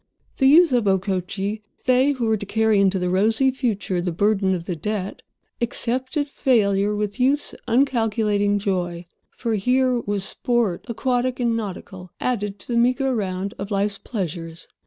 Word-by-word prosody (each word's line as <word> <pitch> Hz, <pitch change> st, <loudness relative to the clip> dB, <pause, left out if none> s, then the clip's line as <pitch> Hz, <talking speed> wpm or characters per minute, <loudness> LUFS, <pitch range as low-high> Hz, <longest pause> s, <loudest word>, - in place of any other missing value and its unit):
The 265 Hz, -, +4 dB
youth 325 Hz, +3 st, +6 dB
of 240 Hz, -3 st, +2 dB
Okochee—they 200 Hz, +7 st, 0 dB
who 250 Hz, -4 st, -2 dB
were 220 Hz, -1 st, +2 dB
to 205 Hz, -, -5 dB
carry 220 Hz, 0 st, +2 dB
into 195 Hz, -1 st, +3 dB
the 180 Hz, -1 st, -1 dB
rosy 220 Hz, +8 st, +3 dB
future 210 Hz, -8 st, -2 dB
the 175 Hz, 0 st, -2 dB
burden 195 Hz, +1 st, +1 dB
of 170 Hz, -2 st, -6 dB
the 175 Hz, -, -3 dB
debt—accepted 235 Hz, -, -3 dB
failure 210 Hz, -7 st, +1 dB
with 205 Hz, 0 st, -3 dB
youth's 275 Hz, +3 st, +2 dB
uncalculating 220 Hz, -5 st, +1 dB
joy. 180 Hz, -3 st, -2 dB, 0.3 s
For, 230 Hz, -2 st, -2 dB
here 250 Hz, +4 st, +2 dB
was 205 Hz, -3 st, -2 dB
sport, 230 Hz, -2 st, -1 dB
aquatic 250 Hz, +1 st, -1 dB
and 235 Hz, -2 st, +1 dB
nautical, 190 Hz, -3 st, -6 dB
added 205 Hz, -5 st, -2 dB
to -, -, -11 dB
the 235 Hz, -, +2 dB
meagre 255 Hz, +2 st, +2 dB
round 195 Hz, -2 st, -3 dB
of 195 Hz, +1 st, -5 dB
life's 200 Hz, 0 st, -1 dB
pleasures. 165 Hz, -6 st, -5 dB
210 Hz, 150 wpm, -22 LUFS, 195-245 Hz, 0.3 s, youth